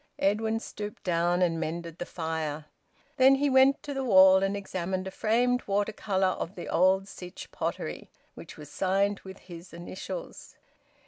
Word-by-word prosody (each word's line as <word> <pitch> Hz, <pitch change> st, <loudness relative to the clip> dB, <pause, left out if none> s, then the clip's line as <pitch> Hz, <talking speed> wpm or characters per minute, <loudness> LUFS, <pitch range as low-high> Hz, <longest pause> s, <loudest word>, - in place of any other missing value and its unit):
Edwin 220 Hz, +3 st, +1 dB
stooped 210 Hz, -2 st, -8 dB
down 175 Hz, -1 st, +1 dB
and 165 Hz, -2 st, +1 dB
mended 170 Hz, 0 st, -5 dB
the 175 Hz, -, -4 dB
fire. 160 Hz, -2 st, -4 dB, 0.5 s
Then 265 Hz, +1 st, +7 dB
he 280 Hz, +1 st, +1 dB
went 265 Hz, +1 st, +5 dB
to 290 Hz, -, -5 dB
the 270 Hz, -1 st, -2 dB
wall 190 Hz, -4 st, +7 dB
and 195 Hz, +1 st, 0 dB
examined 185 Hz, -1 st, -3 dB
a 190 Hz, -, -5 dB
framed 245 Hz, +5 st, +1 dB
water 205 Hz, +2 st, 0 dB
colour 190 Hz, -3 st, 0 dB
of 175 Hz, -, -5 dB
the 175 Hz, -, -7 dB
old 185 Hz, +3 st, +3 dB
Sytch 180 Hz, -2 st, -10 dB
Pottery, -, -, -4 dB, 0.2 s
which -, -, -11 dB
was 150 Hz, -1 st, -11 dB
signed 195 Hz, +5 st, +1 dB
with 190 Hz, 0 st, -11 dB
his 170 Hz, -1 st, -12 dB
initials. 185 Hz, -, -8 dB
190 Hz, 165 wpm, -28 LUFS, 175-215 Hz, 0.5 s, Then